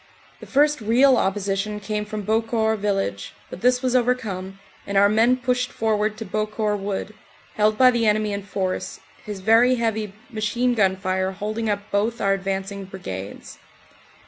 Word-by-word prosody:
The - - -11
first 295 0 +2
real 250 +5 +5
opposition 200 0 -1
came 210 +1 -3
from 210 -1 -5
Beaucourt 220 0 +1
village, 195 - -2 0.2
but 180 - -8
this 250 +1 +3
was 255 -1 +1
overcome, 220 -7 -1 0.3
and 200 0 -1
our 200 +1 +6
men 230 +4 +3
pushed 250 0 -1
forward 215 -1 0
to 220 - -6
Beaucourt 215 +1 -1
wood, 195 +1 -4 0.4
held 215 0 +2
by 255 +1 +7
the 235 -2 +1
enemy 210 0 +1
in 200 - -3
force, 190 -1 -3 0.2
his 205 -2 -7
very 230 +5 +5
heavy 220 -4 -2 0.2
machine 235 +3 0
gun 195 -5 +2
fire 190 0 -1
holding 215 +3 -3
up 205 0 -3
both 220 +4 0
our 195 -1 +2
advancing 195 +1 -3
Brigades. 100 - -8
210 Hz, 160 wpm, -23 LUFS, 195-230 Hz, 0.4 s, by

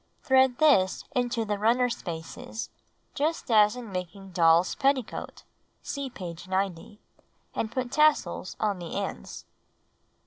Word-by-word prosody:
Thread 260 -3 +4
this 235 -12 +4
into 245 -2 0
the 205 -1 -2
runner 240 +4 +3
spaces 220 +3 -6 0.4
just 305 -3 -1
as 210 0 +5
in 240 -4 -8
making 190 +1 -6
doll'a 170 0 +4
petticoat 270 -4 -1 0.4
(see 280 -2 -4
page 175 -6 -8
90), 190 +1 -2 0.5
and 220 - -2
put 250 0 -3
tassels 300 - +2
on 205 -3 0
the 170 -2 -6
ends. 65 -1 -5
215 Hz, 125 wpm, -27 LUFS, 185-250 Hz, 0.5 s, as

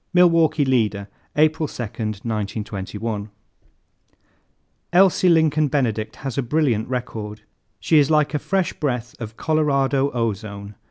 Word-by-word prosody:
Milwaukee 165 -4 +4
Leader, 105 -6 0 0.3
April 155 +1 +2
2, 125 - -6 0.4
1921. 105 -1 -4 1.6
"Elsie 185 0 +4
Lincoln 155 -2 +3
Benedict 115 -6 -1
has 135 -1 -2
a - - +3
brilliant 125 -4 0
record. 110 -4 -5 0.4
She 160 - +4
is 145 0 +3
like 150 -2 +2
a 150 - 0
fresh 190 +1 -1
breath 125 -5 -3
of 110 -1 -7
Colorado 140 -3 +1
ozone. 105 -4 -4
130 Hz, 115 wpm, -22 LUFS, 110-155 Hz, 1.6 s, Milwaukee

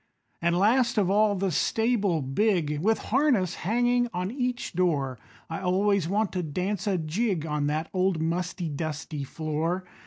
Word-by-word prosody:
An' 170 +1 +2
last 235 +6 +3
of 195 -3 +3
all 210 0 +3
the 190 0 0
stable 205 - +1
big, 150 0 +1
With 220 +7 +2 0.2
harness 245 - +3
hanging 245 +5 +2
on 180 +2 -2
each 250 -1 -2
door, 145 -9 0 0.3
I 165 - -4
always 190 -1 +1
want 210 +1 +1
to 180 - -2
dance 180 +6 -2
a 195 -2 +2
jig 170 +2 -1
On 150 -2 -1
that 155 +2 -1
old 185 -2 +1
musty, 175 +2 -2
dusty 150 -1 -4
floor. 160 +5 -2
180 Hz, 155 wpm, -27 LUFS, 160-210 Hz, 0.3 s, last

